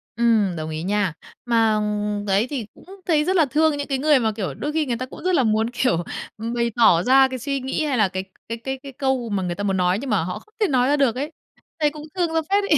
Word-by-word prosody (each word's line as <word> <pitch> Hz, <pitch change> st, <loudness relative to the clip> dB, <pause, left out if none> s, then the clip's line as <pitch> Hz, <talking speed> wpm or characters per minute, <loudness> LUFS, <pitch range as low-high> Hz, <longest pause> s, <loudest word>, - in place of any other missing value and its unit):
Ừm, 225 Hz, -5 st, +3 dB
đồng 155 Hz, 0 st, -4 dB
ý 155 Hz, +1 st, -4 dB
nha. 200 Hz, -2 st, 0 dB, 0.3 s
Mà, 225 Hz, -2 st, +3 dB
ừm, 210 Hz, -1 st, -1 dB
đấy, 200 Hz, +3 st, +2 dB
thì 260 Hz, -7 st, -3 dB
cũng -, -, -18 dB, 0.2 s
thấy 310 Hz, -4 st, +3 dB
rất 375 Hz, +2 st, +1 dB
là 330 Hz, -4 st, +5 dB
thương 300 Hz, +2 st, +2 dB
những 285 Hz, -, -4 dB
cái 275 Hz, -, 0 dB
người 290 Hz, +1 st, +4 dB
mà, 220 Hz, -2 st, +1 dB
kiểu, 210 Hz, -3 st, -4 dB
đôi 295 Hz, -, -4 dB
khi 315 Hz, -1 st, +1 dB
người 240 Hz, -4 st, -2 dB
ta 255 Hz, -, -4 dB
cũng 255 Hz, -, -12 dB
rất 365 Hz, 0 st, +2 dB
là 265 Hz, -, +3 dB
muốn, 220 Hz, +1 st, +1 dB
kiểu, 240 Hz, -9 st, 0 dB, 0.3 s
ừm, 230 Hz, +2 st, -4 dB
bày 235 Hz, -1 st, 0 dB
tỏ 185 Hz, -8 st, +5 dB
ra 265 Hz, +1 st, +6 dB
cái 260 Hz, -1 st, -5 dB
suy 275 Hz, +1 st, -2 dB
nghĩ 265 Hz, +4 st, -2 dB
hay 280 Hz, -4 st, 0 dB
là 215 Hz, -3 st, +4 dB
cái 185 Hz, 0 st, -4 dB, 0.3 s
cái 230 Hz, -, -3 dB
cái 265 Hz, +3 st, -5 dB
cái 275 Hz, -, -8 dB
câu 265 Hz, -3 st, -1 dB
mà 195 Hz, -3 st, -1 dB
người 175 Hz, -1 st, -2 dB
ta 205 Hz, -, -4 dB
muốn 195 Hz, -1 st, 0 dB
nói 180 Hz, +1 st, +2 dB
nhưng 275 Hz, -, -5 dB
mà 205 Hz, -6 st, +2 dB
họ 180 Hz, +2 st, -4 dB
không 430 Hz, -, -25 dB
thể 420 Hz, -, +3 dB
nói 255 Hz, -4 st, +2 dB
ra 290 Hz, -, +3 dB
được 265 Hz, -5 st, +2 dB
ấy, 290 Hz, +5 st, -3 dB, 0.5 s
thấy 300 Hz, -1 st, +3 dB
cũng 300 Hz, 0 st, -9 dB
thương 345 Hz, -3 st, 0 dB
ra 325 Hz, -, +2 dB
phết 405 Hz, +1 st, +3 dB
ấy! 395 Hz, -, +3 dB
240 Hz, 285 wpm, -22 LUFS, 210-285 Hz, 0.5 s, ra